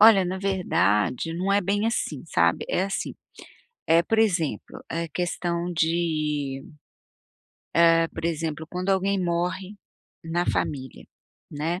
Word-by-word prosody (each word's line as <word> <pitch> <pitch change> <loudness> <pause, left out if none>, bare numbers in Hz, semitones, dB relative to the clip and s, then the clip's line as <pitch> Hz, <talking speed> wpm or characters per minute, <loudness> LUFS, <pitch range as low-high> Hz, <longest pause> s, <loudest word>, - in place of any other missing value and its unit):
Olha, 210 -3 +8
na 185 +1 -3
verdade, 165 - +1
não 185 +3 -1
é 200 - +4
bem 205 +3 0
assim, 170 - -2
sabe? 85 - +2
É - - +1
assim, 195 +1 -3 0.7
é 165 +1 +5
por 225 +6 -1
exemplo, 180 - 0
a 165 0 -2
questão 175 0 -2
de 155 -4 0 1.3
hã, 165 0 +4
por 160 - -6
exemplo, 160 -1 -2
quando 180 +2 -4
alguém 195 0 +1
morre 180 +3 -2 0.5
na 170 +2 0
família, 130 -3 -2 0.5
né. 160 +4 -2
170 Hz, 125 wpm, -25 LUFS, 160-190 Hz, 1.3 s, Olha